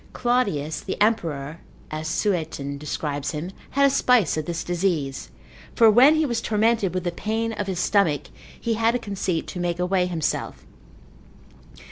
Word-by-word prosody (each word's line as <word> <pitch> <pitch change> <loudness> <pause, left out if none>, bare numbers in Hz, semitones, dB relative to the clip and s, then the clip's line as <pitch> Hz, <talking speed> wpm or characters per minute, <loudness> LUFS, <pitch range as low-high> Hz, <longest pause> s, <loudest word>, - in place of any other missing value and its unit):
Claudius 200 - 0
the 190 - -5
emperor, 165 -8 0 0.3
as 155 +1 -4
Sueton 155 -7 -2
describes 145 -1 -3
him, 160 +5 -4 0.2
had 280 +1 +3
a - - +6
spice 250 - +3
of 155 -1 -3
this 170 0 -3
disease, 170 -7 -1 0.5
for 225 -2 +7
when 260 +8 +7
he 315 0 +2
was 235 -4 -1
tormented 215 -4 +1
with 185 - -1
the 175 - -1
pain 225 +5 -2
of 205 -2 -4
his 185 -3 -2
stomach, 180 -9 +1 0.3
he 230 - -1
had 225 +2 +2
a - - +3
conceit 195 -6 -2
to 180 - -7
make 175 -1 -1
away 180 0 +1
himself. 165 -4 -3
185 Hz, 160 wpm, -24 LUFS, 160-225 Hz, 0.5 s, for